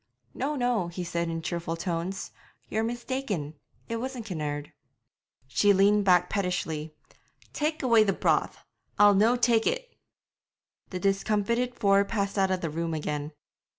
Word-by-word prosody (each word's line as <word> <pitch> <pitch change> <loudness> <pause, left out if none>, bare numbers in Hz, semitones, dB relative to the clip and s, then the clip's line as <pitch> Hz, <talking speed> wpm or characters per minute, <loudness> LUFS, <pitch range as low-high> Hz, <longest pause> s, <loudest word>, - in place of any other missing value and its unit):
'No, 285 +3 -2
no,' 245 -8 0
he 175 +1 -5
said 170 0 -2
in 165 0 -4
cheerful 170 -1 -3
tones; 175 +3 -3 0.4
'you're 220 +1 0
mistaken 235 - -3 0.3
it 230 - -3
wasn't 250 -1 -5
Kinnaird.' 150 -6 -4 0.7
She 200 +10 +3
leaned 200 +1 +4
back 180 -2 +5
pettishly. 165 -6 -2 0.6
'Tak' 305 0 -1
away 230 -4 +5
the 200 - +2
broth; - - 0 0.3
I'll 205 0 +7
no' 220 +5 +4
tak' 235 -2 +3
it!' - - -2 0.9
The 185 - -4
discomfited 210 +5 0
four 200 -3 +4
passed 200 -1 -2
out 190 -1 +3
of 185 -1 -1
the 165 - -2
room 165 +1 -2
again. 150 -1 -3
200 Hz, 145 wpm, -27 LUFS, 170-230 Hz, 0.9 s, I'll